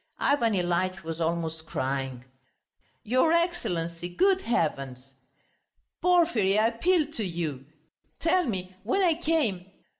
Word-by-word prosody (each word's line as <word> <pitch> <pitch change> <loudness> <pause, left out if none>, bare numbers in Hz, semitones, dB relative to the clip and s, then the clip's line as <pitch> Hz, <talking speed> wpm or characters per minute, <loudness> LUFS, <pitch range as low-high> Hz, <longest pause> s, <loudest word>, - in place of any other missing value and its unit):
Ivan 240 -6 +2
Ilyitch 180 +1 -1
was 165 +1 -5
almost 165 -1 -2
crying. 130 -3 -3 0.8
"Your 255 +8 +2
Excellency, 175 - -1
good 380 - +2
heavens!" 135 - -2 0.9
"Porfiry, 330 - +3
I 220 +1 +4
appeal 325 +8 +2
to 235 -8 -3
you.... 160 -7 -4 0.5
Tell 350 +3 +2
me, 185 -6 -4
when 255 - +1
I 345 -3 +4
came 300 - 0
190 Hz, 115 wpm, -27 LUFS, -, 0.9 s, I